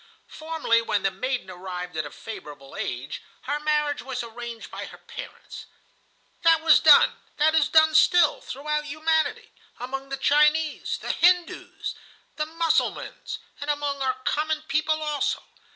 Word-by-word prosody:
"Formerly, 310 -8 0
when 210 -3 -1
the 195 - +2
maiden 255 -6 -3
arrived 180 -1 -7
at 155 -1 -2
a - - -12
favorable 150 -10 -10
age, 125 +3 -4 0.2
her 290 +2 -2
marriage 300 -1 0
was 255 -2 -4
arranged 235 0 -8
by - - -6
her - - -12
parents. - - -10 0.7
That 330 -2 +5
was 325 - +7
done, - - +6 0.2
that 310 +1 +4
is 310 -2 +3
done 315 0 +5
still, 345 0 +5
throughout 300 +2 -3
humanity, 315 +1 0 0.3
among 270 +2 -5
the 275 - -3
Chinese, 300 +3 +2
the - - -3
Hindoos, 355 0 +1 0.4
the 305 0 -2
Mussulmans, 330 0 -1 0.2
and 285 - -5
among 290 -1 -1
our 260 -1 +1
common 305 +1 0
people 310 0 0
also. 295 -2 -1
295 Hz, 145 wpm, -25 LUFS, 240-315 Hz, 0.7 s, was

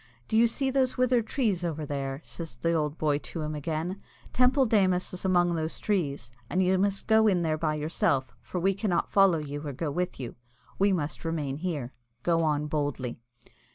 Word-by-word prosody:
"Do - - -2
you 230 +1 +6
see 265 +3 0
those 260 -1 +1
withered 250 -3 +2
trees 215 -10 0
over 160 -3 -2
there?" 140 -1 -3
says 165 -8 -7
the 165 +8 0
old 150 -1 0
boy 150 -2 +1
to 165 - -6
him 155 0 -3
again. 160 +5 -3 0.3
"Teampoll 255 +1 +4
Démus 185 -5 +2
is 180 - -6
among 175 -2 +3
those 160 -1 -2
trees, 145 - -1 0.2
and 185 +1 +2
you 185 0 +3
must 200 0 0
go 220 0 +5
in 180 -4 +3
there 160 -1 +1
by 155 -1 0
yourself, 150 -4 0
for 180 - -4
we 195 +3 +2
cannot 190 -3 -1
follow 195 -4 +5
you 145 -1 -5
or 145 -2 -5
go 145 +3 -3
with 180 +2 -2
you. 125 -3 -5 0.5
We 200 +1 +4
must 155 -5 -2
remain 150 -5 -2
here. 150 -7 -3 0.3
Go 170 -1 +2
on 150 -1 +1
boldly." 145 -5 -2
170 Hz, 195 wpm, -28 LUFS, 150-195 Hz, 0.5 s, you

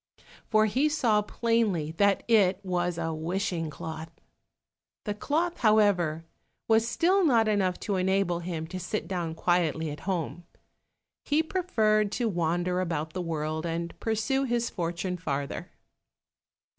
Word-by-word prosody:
For 215 -1 +4
he 265 +8 +2
saw 235 -8 +2
plainly 210 -8 0
that 200 -1 +3
it 205 -5 +4
was 180 -2 -1
a 165 -1 -2
wishing 165 0 -2
cloth. 160 +2 -7 1.0
The 210 - -1
cloth, 320 +11 -1
however, 200 -8 +3 0.4
was 225 0 +4
still 370 +10 +2
not 235 -8 +4
enough 195 -4 +1
to 200 -3 -1
enable 185 -2 +1
him 170 -2 -4
to 185 - -5
sit 185 +4 -3
down 175 -4 -3
quietly 165 -3 +1
at 145 - -7
home; 175 -1 -2 0.8
he 300 +2 +2
preferred 215 - +1
to 240 - 0
wander 175 -1 0
about 160 -3 -3
the 185 - -3
world 155 -2 -2
and 170 0 -3
pursue 225 +5 0
his 240 -1 0
fortune 175 +1 -3
farther. 140 -4 -4
185 Hz, 135 wpm, -28 LUFS, 165-220 Hz, 1.0 s, For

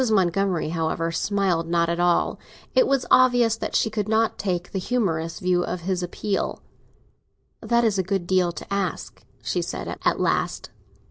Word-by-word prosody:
Montgomery, 190 -4 +1
however, 165 0 -1
smiled 185 -2 0
not 170 0 +2
at 170 +1 -1
all; 175 -1 +2 0.3
it - - +4
was 270 -2 +1
obvious 245 -3 +5
that - - -4
she 220 - +2
could 210 -1 -2
not 225 0 +1
take 180 -2 -2
the 190 - -2
humorous 175 -7 -1
view 180 -1 +1
of 180 0 -4
his 180 +1 -1
appeal. 195 +3 -3 1.0
"That 235 0 +2
is 210 -4 +2
a - - +2
good 190 -1 -2
deal 180 -1 +2
to 170 +4 -7
ask," 195 -4 -3 0.2
she - - -1
said - - -5
at - - +2
last. - - -1
185 Hz, 170 wpm, -24 LUFS, 170-215 Hz, 1.0 s, obvious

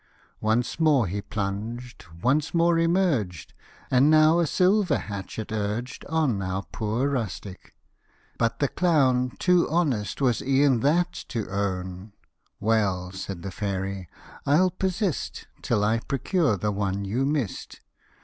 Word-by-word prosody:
Once 115 +7 0
more 150 -7 +4
he 100 +3 -3
plunged: 110 +4 -5 0.2
once 145 +6 +1
more 170 0 +4
emerged, 165 - 0 0.4
And 130 +3 +5
now 155 +2 +5
a 170 - +2
silver 190 +4 +3
hatchet 100 +2 -6
urged 110 +4 -3
On 150 -11 0
our 95 +1 -2
poor 110 +5 -1
rustic; 105 -7 -5 0.6
but 115 -1 +1
the 140 - +1
clown 130 -7 +2
Too 180 -1 +3
honest 145 - 0
was 125 -5 +2
e'en 135 -1 +3
that 170 +7 +2
to 115 -3 -3
own; 95 0 -3 0.2
" - - -45
Well," 100 -4 +1
said 95 -2 -6
the 95 - -5
fairy, 95 -1 -3 0.2
" - - -19
I'll 175 +6 +4
persist 190 - -2 0.2
Till 105 - +1
I 110 +2 +2
procure 140 - 0
the 105 +3 -1
one 100 -1 -2
you 115 +7 -1
miss'd." 140 -7 -2
120 Hz, 140 wpm, -25 LUFS, 100-155 Hz, 0.6 s, And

